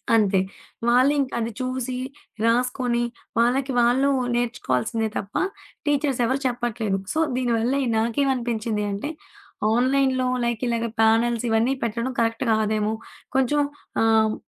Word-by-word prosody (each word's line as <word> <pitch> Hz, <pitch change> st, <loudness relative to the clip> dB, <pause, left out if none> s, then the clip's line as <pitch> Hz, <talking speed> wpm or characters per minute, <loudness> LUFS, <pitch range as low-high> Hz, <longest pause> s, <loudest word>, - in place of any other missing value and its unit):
అంతే. 200 Hz, -3 st, +3 dB, 0.5 s
వాళ్ళింక 265 Hz, +3 st, +3 dB
అది 230 Hz, 0 st, -2 dB
చూసి, 255 Hz, 0 st, -2 dB, 0.5 s
రాసుకొని 245 Hz, 0 st, +1 dB, 0.4 s
వాళ్ళకి 260 Hz, +3 st, +2 dB
వాళ్ళు 255 Hz, +4 st, +3 dB, 0.3 s
నేర్చుకోవాల్సిందే 225 Hz, -, -1 dB
తప్ప 200 Hz, -, -6 dB, 0.5 s
టీచర్స్ 285 Hz, -3 st, +1 dB
ఎవరు 260 Hz, +3 st, 0 dB
చెప్పట్లేదు. 235 Hz, -5 st, -1 dB
సో, 315 Hz, -, -1 dB, 0.2 s
దీనివల్ల 245 Hz, 0 st, +1 dB, 0.2 s
నాకేమనిపించింది 235 Hz, -3 st, 0 dB
అంటే, 200 Hz, +9 st, -3 dB, 0.6 s
ఆన్‌లైన్‌లో 260 Hz, +1 st, +2 dB, 0.2 s
లైక్ 235 Hz, -2 st, -1 dB
ఇలాగ 235 Hz, 0 st, 0 dB, 0.2 s
ప్యానెల్స్ 230 Hz, +1 st, +3 dB
ఇవన్నీ 225 Hz, +4 st, +2 dB
పెట్టడం 235 Hz, +3 st, -1 dB
కరెక్ట్ 230 Hz, +1 st, +1 dB
కాదేమో. 215 Hz, 0 st, +1 dB, 0.4 s
కొంచెం 265 Hz, +3 st, +2 dB, 0.4 s
ఆహ్, 220 Hz, -1 st, +4 dB
235 Hz, 110 wpm, -24 LUFS, 225-260 Hz, 0.6 s, ఆహ్